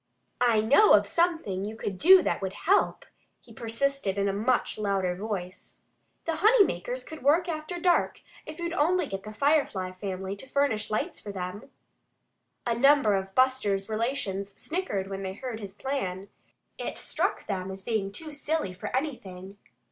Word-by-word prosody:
"I 235 -3 +4
know 280 - +6
of - - +6
something 325 - 0
you 215 +2 -5
could 200 -4 -5
do 370 +2 +8
that - - -1
would 190 -1 -3
help," 385 - +1 0.3
he 230 - -17
persisted, 230 -2 -1
in 200 0 +1
a 195 - 0
much 225 +3 0
louder 195 -3 0
voice. 190 -2 -6 0.4
"The 330 -1 -1
honey 430 +5 +6
makers - - -4
could 315 - -10
work 315 +7 +3
after 325 +1 -4
dark 350 0 +2 0.3
if 310 - -7
you'd 340 0 -3
only 350 +2 +2
get 195 -7 -5
the 215 - -6
Firefly 245 -8 +1
family 190 0 -5
to 260 - -11
furnish 260 -7 0
lights 215 - -2
for 205 - -7
them." 190 +5 -6 1.0
A 235 - +1
number 275 -2 +5
of 195 0 -2
Buster's 225 -7 +2
relations 215 -4 -2
snickered 310 - -2
when 195 0 -5
they 190 -1 -4
heard 245 -1 -6
his 200 -2 -8
plan. 200 -8 -3 0.5
It - - -4
struck - - -1
them 190 -2 -3
as 190 0 -8
being 210 -4 -1
too 310 +9 -6
silly 295 -8 -2
for 180 - -7
anything. 200 -9 -6
220 Hz, 170 wpm, -28 LUFS, 195-295 Hz, 1.0 s, do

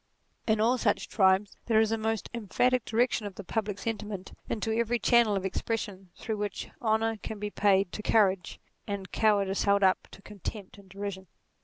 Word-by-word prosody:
In 220 -1 +3
all 240 +4 +3
such - - 0
tribes 190 0 +3
there 220 -2 +4
is 220 0 +3
a - - +2
most 220 -1 -1
emphatic 245 +2 +1
direction 230 -2 +1
of 195 - -9
the 200 - -7
public 205 +1 -2
sentiment 210 -3 -5 0.2
into 220 0 -1
every 235 +1 +1
channel 235 -3 +4
of 195 -1 -2
expression 195 -1 -3
through 220 -2 -4
which 205 0 -4
honour 225 0 +1
can 215 +1 -6
be 205 0 -4
paid 195 -3 +3
to - - -5
courage 195 -5 +2 0.3
and 200 -2 -4
cowardice 200 -3 +2
held 200 0 +3
up 185 -1 +3
to 195 - -14
contempt 205 -1 -7
and 195 -1 -17
de 195 - -15
rision. 195 -2 -5
210 Hz, 185 wpm, -29 LUFS, 195-225 Hz, 0.3 s, there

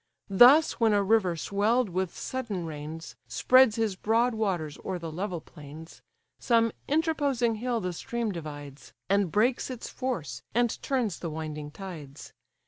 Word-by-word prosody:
Thus 255 +10 +7
when 225 -2 +4
a 205 -1 +3
river 195 -4 +2
swell'd 210 +8 +1
with 185 0 -3
sudden 225 -9 -4
rains 160 +1 -7
Spreads 255 -3 +5
his 220 -4 0
broad 230 +5 +1
waters 185 -9 -2
o'er 190 - -3
the 165 -2 -6
level 180 +1 -3
plains, 150 +2 -12 0.4
Some 230 -2 +3 0.2
interposing 285 -7 +1
hill 245 -2 0
the 180 -1 -3
stream 235 +5 -3
divides, 145 -5 -9 0.2
And 200 -4 +2
breaks 240 +6 +1
its 250 -3 -6
force, 165 - -4
and 240 -1 +1
turns 240 -10 -1
the 170 - -4
winding 155 -1 -5
tides. 155 -5 -9
200 Hz, 145 wpm, -28 LUFS, 160-235 Hz, 0.4 s, Thus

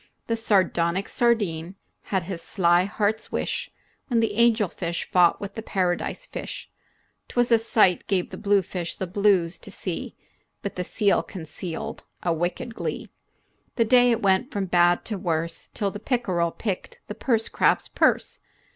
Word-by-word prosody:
The 230 - 0
sardonic 190 -4 +1
sardine 195 -8 0 0.3
had 190 -3 0
his 170 -1 -5
sly 175 -2 +3
heart's 215 +2 -1
wish - - -2 0.4
When 240 -4 +2
the 225 -2 +1
angelfish 210 -7 +1
fought 175 -2 +5
with 200 0 -6
the 225 - -5
paradise 185 - -1
fish. - - -7 0.6
'T - - -14
was 245 0 +2
a 230 - +6
sight 215 -5 +3
gave 190 -4 0
the - - -6
bluefish 195 -4 0
the 190 - -3
blues 185 -2 +2
to - - -11
see, - - -5 0.5
But 200 - -4
the 180 - -2
seal 200 +1 +2
concealed 165 0 -7 0.2
a 175 - +2
wicked 180 +9 -2
glee - - -4 0.7
The 230 - +3
day 245 +1 +6
it 235 -2 +1
went 195 +6 +3
from 200 -6 -2
bad 175 -1 +3
to 210 -3 -3
worse, 165 -2 -2
Till 200 -2 0
the 205 - -7
pickerel 195 -8 0
picked 195 +2 -5
the - - -6
purse 225 0 0
crab's - - +2
purse. - - +1
195 Hz, 160 wpm, -25 LUFS, 175-225 Hz, 0.7 s, a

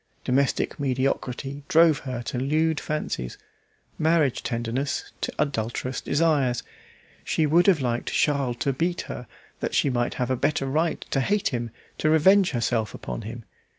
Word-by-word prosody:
Domestic 140 +3 +1
mediocrity 135 +1 -1
drove 160 -2 +5
her 125 -3 -5
to 120 - -3
lewd 155 +4 +1
fancies, 65 - -3 0.6
marriage 155 -5 +2
tenderness 120 +4 -2
to - - -1
adulterous 125 -1 -2
desires. 140 -5 +1 0.6
She 160 - +1
would 170 +5 +4
have 180 -7 +5
liked 120 -2 -1
Charles 140 -5 +1
to 140 - +1
beat 170 +6 -1
her, 125 - -7 0.3
that - - -2
she 140 - +3
might 120 -1 0
have 125 0 -1
a - - +2
better 135 +2 0
right 155 +5 0
to 135 - +2
hate 205 +9 +1
him, 120 -2 -3 0.3
to 155 - +2
revenge 185 +5 +5
herself 115 -4 -1
upon - - -5
him. 115 +1 -8
135 Hz, 150 wpm, -25 LUFS, 120-155 Hz, 0.6 s, drove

